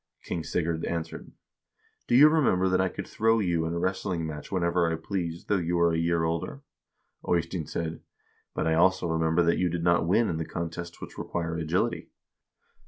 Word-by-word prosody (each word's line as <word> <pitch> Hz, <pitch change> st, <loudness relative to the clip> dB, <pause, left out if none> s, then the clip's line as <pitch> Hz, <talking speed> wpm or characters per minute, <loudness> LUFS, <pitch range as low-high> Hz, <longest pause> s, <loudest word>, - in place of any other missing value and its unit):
King 85 Hz, -, -3 dB
Sigurd 80 Hz, 0 st, -1 dB
answered: 85 Hz, -1 st, -5 dB, 0.4 s
' -, -, -41 dB
Do 120 Hz, -, +2 dB
you 145 Hz, +4 st, +9 dB
remember 135 Hz, -, +3 dB
that 95 Hz, 0 st, +2 dB
I 95 Hz, -, +1 dB
could -, -, -7 dB
throw 115 Hz, +1 st, +2 dB
you 85 Hz, -6 st, 0 dB
in 85 Hz, -, -3 dB
a -, -, -1 dB
wrestling 95 Hz, -1 st, -1 dB
match 75 Hz, -2 st, -7 dB
whenever 85 Hz, -2 st, +1 dB
I -, -, 0 dB
pleased, 85 Hz, 0 st, -4 dB
though 105 Hz, -, +2 dB
you 85 Hz, -1 st, -1 dB
are 85 Hz, 0 st, +4 dB
a -, -, +1 dB
year 85 Hz, 0 st, +1 dB
older? 85 Hz, -, -3 dB, 0.3 s
' -, -, -16 dB
Eystein 85 Hz, -2 st, 0 dB
said: 80 Hz, 0 st, -4 dB, 0.3 s
' -, -, -40 dB
But -, -, -1 dB
I 80 Hz, -, +2 dB
also 95 Hz, +3 st, +3 dB
remember 80 Hz, +1 st, +2 dB
that 85 Hz, 0 st, +2 dB
you 90 Hz, -, +2 dB
did 85 Hz, 0 st, -3 dB
not 85 Hz, -1 st, +3 dB
win 110 Hz, +6 st, +3 dB
in 80 Hz, -, -2 dB
the 80 Hz, -, -2 dB
contests 85 Hz, +1 st, -6 dB
which -, -, -9 dB
require 85 Hz, -1 st, -3 dB
agility.' 80 Hz, +2 st, -1 dB
85 Hz, 205 wpm, -27 LUFS, 80-90 Hz, 0.4 s, you